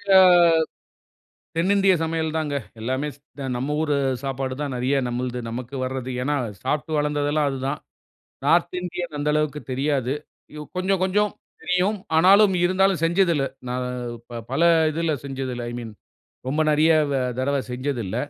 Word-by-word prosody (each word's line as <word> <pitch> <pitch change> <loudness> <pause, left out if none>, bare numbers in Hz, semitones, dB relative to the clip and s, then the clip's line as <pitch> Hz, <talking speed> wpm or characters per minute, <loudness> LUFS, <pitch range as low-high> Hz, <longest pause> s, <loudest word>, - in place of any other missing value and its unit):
ஆ - - +10 1.4
தென்னிந்திய 195 +2 +4
சமையல் 160 -1 -1
தாங்க. 150 -2 -2 0.3
எல்லாமே 130 +5 -1
ஸ் - - -22 0.2
த 140 - -5
நம்ம 140 +4 -2
ஊர் 150 -2 0 0.3
சாப்பாடு 135 -1 -3
தான். 145 -2 -2
நிறைய 130 +3 +1
நம்மளது 125 0 -3
நமக்கு 125 +3 -6
வருது. 130 0 -4
ஏன்னா, 145 +3 0 0.3
சாப்பிட்டு 150 +1 -1
வளர்ந்தது 145 0 0
எல்லாம் 150 -2 +2
அது 135 - -4
தான். 145 - -3 0.7
நார்த் 175 +1 +3
இந்தியன் 175 -2 -5
அந்த 150 +1 0
அளவுக்கு 150 -1 0
தெரியாது. 135 -1 0 0.4
யு 150 - -6
கொஞ்சம் 185 +1 +1
கொஞ்சம் 205 +2 +2 0.3
தெரியும். 185 +3 +1 0.2
ஆனாலும் 195 +3 +6
இருந்தாலும் 185 -1 +2
செஞ்சது 175 +1 +3
இல்ல. 140 -2 +1 0.2
நான் 125 0 -2 0.4
ப 120 - -5
பல 150 +5 +1 0.3
இதில 165 0 0
செஞ்சது 135 -2 -4
இல்ல. 120 - -5
ஐ - - -6
மீன் 115 -2 -8 0.6
ரொம்ப 150 +4 0
நிறைய 155 +2 +4 0.2
வ - - -1 0.2
தடவ 140 +2 +1
செஞ்சதில்ல. 125 -5 -3
150 Hz, 155 wpm, -23 LUFS, 130-170 Hz, 1.4 s, ஆ